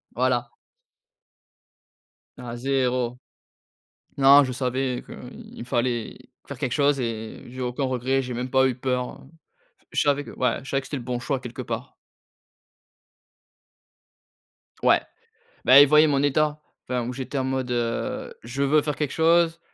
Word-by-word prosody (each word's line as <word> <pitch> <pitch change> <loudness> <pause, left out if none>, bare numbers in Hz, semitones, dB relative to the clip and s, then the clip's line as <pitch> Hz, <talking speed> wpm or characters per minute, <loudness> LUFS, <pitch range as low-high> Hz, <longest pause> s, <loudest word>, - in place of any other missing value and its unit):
Voilà. 125 -1 +1 1.9
Non 120 -2 -7
0. 125 -1 -1 1.0
Non, 140 +1 +8
je 130 - -3
savais 130 0 -2
qu'il 120 - -10
fallait 120 -1 -1 0.3
faire - - -7
quelque 130 - -2
chose 145 -1 +2
et 110 -3 -5
j'ai 130 +1 -8
aucun 125 +2 -2
regret. 130 +1 0
J'ai 125 -1 -5
même 125 +2 -4
pas 130 0 +4
eu 130 - -2
peur. 125 0 -3 0.7
Je - - +1
savais 145 0 +2
que - - -9
ouais, 125 - 0
je 135 - -10
savais 135 - 0
que 130 - -12
c'était 145 - -4
le 125 - -7
bon 125 0 -3
choix, 135 +2 -2
quelque 125 0 -7
part. 120 +3 -5 2.9
Ouais, - - +5 0.6
bah, 130 +3 +9
ils 145 - +8
voyaient 150 +1 +6
mon 140 -2 +1
état. 150 +1 +1 0.2
Enfin, 125 -2 -2
où 125 - -3
j'étais 135 +2 -4
en 130 - -1
mode: 130 -1 -2
heu, 120 -1 -2
je 125 +5 -4
veux 145 +2 +3
faire 150 -2 -2
quelque 150 -3 -2
chose, 165 +1 +3
130 Hz, 150 wpm, -24 LUFS, 125-140 Hz, 2.9 s, bah